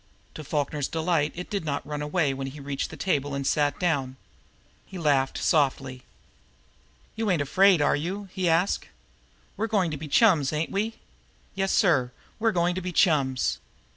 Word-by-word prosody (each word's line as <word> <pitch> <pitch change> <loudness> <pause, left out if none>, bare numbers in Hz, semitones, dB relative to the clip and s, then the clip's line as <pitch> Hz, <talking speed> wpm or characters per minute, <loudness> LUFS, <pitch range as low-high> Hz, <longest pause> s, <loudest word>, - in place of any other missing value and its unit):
To 155 - -8
Falkner's 145 -1 -2
delight 160 -2 0
it 180 +1 -6
did 200 -3 -2
not 145 -2 -3
run 150 0 -4
away 150 -1 0
when 135 0 -5
he 140 +3 -9
reached 140 0 -4
the - - -10
table 145 -6 -1
and 140 0 -3
sat 145 +1 +1
down. 140 -8 0 0.7
He 190 - -10
laughed 140 -5 +1
softly. 135 -4 0 1.1
"You 220 -1 -1
ain't 180 -4 +2
afraid, 185 +2 +4
are - - +3
you?" 190 +7 -4
he 185 -2 0
asked. 170 +4 +1 0.7
"We're 220 +3 -1
goin' 195 -6 +1
to 150 - -4
be 155 +2 -7
chums, 155 - +4
ain't 155 +1 -2
we? 215 +3 -1 0.6
Yessir, 185 - +2 0.3
we're 225 0 +2
goin' 175 -2 +1
to 185 - -4
be 180 0 -4
chums!" 140 -7 +2
155 Hz, 170 wpm, -26 LUFS, 140-185 Hz, 1.1 s, afraid